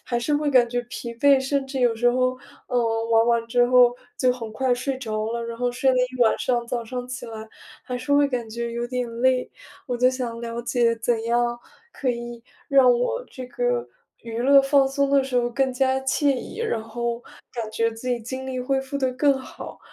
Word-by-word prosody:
还 240 - -1
是 290 +5 0
会 295 0 0
感 250 -3 +5
觉 245 +1 -2
疲 235 -1 -6
惫， 275 +3 +5
甚 270 +1 -1
至 270 0 -5
有 240 -2 +3
时 245 +2 +3
候， 255 +1 +1 0.3
嗯， 250 - -1 0.3
玩 225 0 +5
完 235 -1 +2
之 245 +1 +3
后 245 -1 +5 0.2
就 255 -1 +3
很 230 -3 -7
快 255 +2 +1
睡 260 +2 -3
着 215 -3 -3
了。 235 0 -3
然 230 0 -6
后 245 0 0
睡 260 +2 +2
了 255 - +1
一 250 0 -1
晚 225 - +3
上， 240 -2 0
早 235 -1 -3
上 250 +1 -5
起 255 0 -6
来 220 -1 -8 0.4
还 250 - -4
是 270 +4 -3
会 285 0 +5
感 240 -4 -3
觉 235 +1 -4
有 235 +1 -3
点 250 0 -3
累。 255 -1 +2 0.4
我 245 - -2
就 250 +1 +4
想 245 -3 -4
了 235 0 -4
解， 235 -1 +1
怎 225 0 -1
样 240 +1 +1 0.3
可 260 - -2
以 240 -1 -6 0.3
让 265 -3 +6
我 250 - -1
这 255 -2 -8
个 - - -1 0.3
娱 230 -1 -8
乐 275 +3 +6
放 275 0 +3
松 280 +1 0
的 275 -1 +4
时 265 -1 -6
候 240 0 +2
更 260 +2 0
加 265 +1 +1
惬 275 +1 +2
意， 255 - -8
然 440 - -1
后 235 +1 -3 0.3
感 230 -2 -4
觉 230 +1 +1
自 225 +3 -10
己 245 -2 0
精 260 +3 -6
力 255 -1 -3
恢 270 +2 0
复 270 +1 -5
得 260 -2 +1
更 280 +2 +3
好， 260 - -10
250 Hz, 240 characters per minute, -24 LUFS, 235-265 Hz, 0.4 s, 让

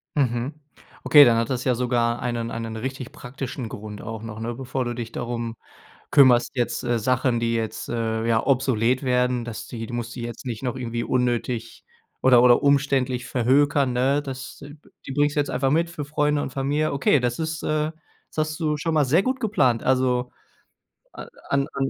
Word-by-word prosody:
Mhm. 125 -1 0 0.5
Okay, 145 -1 +8
dann 115 -2 +4
hat 115 +2 0
das 125 -2 -2
ja 125 - +2
sogar 120 -1 0
einen 120 -2 -2
einen 115 -1 -5
richtig 130 +3 -5
praktischen 130 -3 -6
Grund 105 0 -8
auch 110 -1 -6
noch, 110 -1 -7
ne, 115 +1 -3
bevor 130 0 -3
du 120 - -2
dich 115 -1 -6
darum 120 -1 -4 0.6
kümmerst 130 -4 +5
jetzt, 120 -1 -1
äh, 120 -1 +1
Sachen, 125 +1 +1
die 115 0 0
jetzt, 115 -1 -3
äh, 115 -1 -2
ja 115 -1 +2
obsolet 130 -2 +2
werden, 125 -1 +1
dass 115 -2 -7
die 115 -2 -6
du 120 - -7
musst 115 -1 -4
dich 120 - -5
jetzt 120 +2 -7
nicht 115 -2 -4
noch 125 -2 -2
irgendwie 120 -2 -3
unnötig 120 -2 -1 0.4
oder 125 -2 +6
oder 125 -1 +6
umständlich 135 -3 +1
verhökern, 135 +2 +2
ne? 135 +4 +1
Das 130 -1 -8 0.4
die 135 - -5
bringst 145 +1 +1
du - - +4
jetzt 145 - -2
einfach 135 +1 0
mit 170 +3 +1
für 155 -4 -5
Freunde 150 0 +1
und 135 - -3
Familie. 145 +3 0
Okay, 140 0 +3
das 120 +2 -1
ist, 160 0 -3
äh 155 0 0 0.4
das 155 0 0
hast 155 +2 -7
du 150 -2 0
schon 160 +1 -1
mal 150 - +4
sehr 155 +8 +3
gut 260 +3 -1
geplant. 130 - +2
Also 125 -1 +1 0.8
a - - -9 0.2
an 140 0 +1
an 135 -1 -1
125 Hz, 195 wpm, -24 LUFS, 120-140 Hz, 0.8 s, Okay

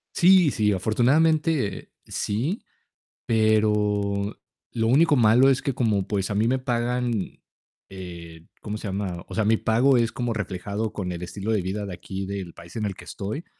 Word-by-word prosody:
Sí, 180 -4 +6
sí, 105 -1 +1
afortunadamente 135 - +1
sí, 135 - -2 0.6
pero 105 -2 +1 0.4
lo 115 -1 0
único 145 +5 +4
malo 120 +3 +5
es 135 - +2
que 135 - -1
como, 110 -6 0
pues, 100 -2 -1
a 100 - -2
mí 110 +2 +2
me 130 0 +1
pagan, 120 -3 -2 0.5
eh, 85 -3 -10
¿cómo 105 0 -5
se 105 - -5
llama?, 95 -3 -4
o - - -8
sea, 110 -1 0
mi 110 +1 +4
pago 125 +5 +3
es 115 -1 +2
como 120 -2 -2
reflejado 100 +1 -3
con 90 -3 -4
el 85 - -7
estilo 100 +4 -4
de 105 - +1
vida 100 +3 -3
de 95 - -6
aquí, 95 +2 -6
del 95 -3 -5
país 85 +4 -14
en 110 - -3
el 95 -2 -3
que - - -12
estoy, 110 - -5
105 Hz, 175 wpm, -24 LUFS, 100-120 Hz, 0.6 s, Sí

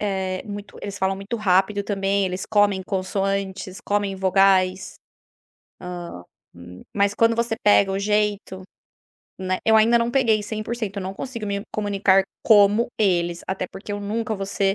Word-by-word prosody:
eh, 190 -2 -2
muito 205 0 -8
eles 200 -1 -6
falam 190 0 0
muito 200 +4 -5
rápido 200 0 +2
também, 195 -1 0
eles 185 +1 -4
comem 205 -3 +2
consoantes, 195 0 -2
comem 205 -1 0
vogais. 190 0 +2 1.6
Hã, 85 - -15
hum, 90 +1 -12
mas 200 0 +2
quando 230 +1 +3
você 235 -1 0
pega 200 -1 +5
o 195 - -1
jeito, 205 -2 -1 0.8
né, 185 0 -1
eu 220 0 +6
ainda 230 +2 +5
não 235 0 0
peguei 230 -5 +2
100% 215 -1 -4
eu - - -4
não 190 +1 -4
consigo 235 0 -6
me 200 0 -2
comunicar 200 -2 +2 0.2
como 210 +1 +5
eles 175 -4 +1
até 190 -1 -2
porque 195 +3 -8
eu 205 - -4
nunca 220 +2 -2
vou 195 0 -4
ser 195 -1 0
200 Hz, 160 wpm, -23 LUFS, 190-210 Hz, 1.6 s, eu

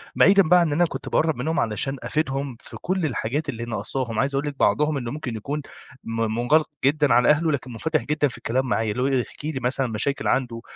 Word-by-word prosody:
بعيدًا 195 0 +6
بقى 180 +2 +5
عن 170 - +3
إن - - -2
أنا 175 +3 +3
كنت - - -6
باقرَب 160 -1 +2
منهم 155 +7 -1
علشان 125 +5 0
أفيدهم 135 -4 -2
في - - -9
كل 185 -1 -1
الحاجات 140 +2 -2
اللي 115 0 -4
ناقصاهم، 115 +2 -3
عايز 140 0 +1
أقول 140 +2 -1
لِك 145 - -4
بعضهم 150 -1 +2
إنه 120 -3 -4
ممكن 135 -6 -5
يكون 140 +7 -4 0.4
م 115 0 -3 0.2
منغلِق 150 +6 +3 0.2
جدًا 145 -2 +3
على 125 +2 +4
أهله 155 +2 +3
لكن 130 -3 -3
منفتِح 155 +7 -1
جدًا 150 -1 +1
في 125 - -7
الكلام 130 +3 -1
معايا، 115 -4 0
اللي 125 +4 -1
هو 135 - +2
يحكِ 135 +2 -2
لي 150 -4 -2
مثلًا 130 +2 0
مشاكل 120 +6 -1
عنده، 120 -3 0
135 Hz, 225 wpm, -24 LUFS, 120-150 Hz, 0.4 s, بعيدًا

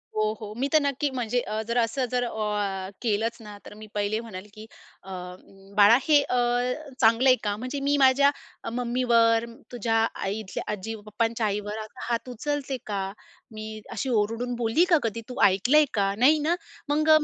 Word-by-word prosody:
हो, 215 0 +1
हो. 210 0 -6
मी 270 +3 0
तर 310 - +7
नक्की 280 0 0
म्हणजे 245 -1 -1
अ, 215 +1 -3
जर 235 - -1
असं 240 +3 +1
जर 250 -1 +1
अ, 210 -4 -2
केलंच 230 0 0
ना 210 -1 -10
तर - - -10
मी 215 0 -11
पहिले 205 +2 0
म्हणंल 205 -4 -8
की, 215 0 -10 0.4
"अ, 190 - -12 0.7
बाळा 210 +3 +8
हे 295 -2 +6
अ, 250 - -1 0.6
चांगलं 230 +3 +5
आहे 255 - +7
का? 205 -1 0
म्हणजे 255 +4 -4
मी 290 - +3
माझ्या 275 +1 +5 0.4
मम्मीवर, 235 -2 +2 0.3
तुझ्या 230 -1 -1 0.3
आई 195 +2 -2
इथल्या 210 -3 -5
आजी 220 +3 -5
पप्पांच्या 225 +1 -1
आईवर, 210 +1 -2
आता 220 +3 -8
हात 235 +2 -2
उचलते 275 +2 -3
का? 205 -3 -2 0.5
मी 215 0 -7
अशी 265 - -3
ओरडून 230 +2 0
बोलली 235 +8 +2
का 335 - +6
कधी? 230 0 -2
तू 250 - -6
ऐकलंय 240 +11 +4
का, 195 -1 +1
नाही 290 +6 +5
ना. 320 +4 +1 0.3
मग 310 +2 +1
230 Hz, 180 wpm, -26 LUFS, 215-255 Hz, 0.7 s, बाळा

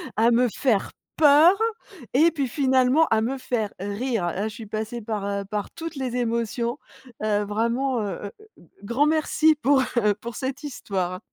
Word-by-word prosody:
à 230 +2 +4
me 245 +1 +4
faire 230 -8 +1 0.3
peur, 310 +5 +7 0.6
et 330 +4 +5
puis 280 -4 -2
finalement, 265 +2 +3
à 220 0 +3
me 265 +4 -1
faire 230 -5 -2
rire. 205 +1 -2
Là 190 +5 -2
je 220 - -7
suis 225 - -8
passée 220 +2 -5
par, 215 -2 -3
heu, 200 0 -2
par 205 0 -4
toutes 330 -1 -7
les 255 -2 -3
émotions, 235 +1 -1 0.4
heu, 210 -1 +1
vraiment, 235 +4 0
heu, 200 0 -5 0.5
grand 240 +8 +1
merci 310 0 +3
pour, 280 -2 +3
heu, 210 -3 +3
pour 230 +1 -8
cette 265 +2 -4
histoire. 185 -9 -3
235 Hz, 165 wpm, -24 LUFS, 210-270 Hz, 0.6 s, peur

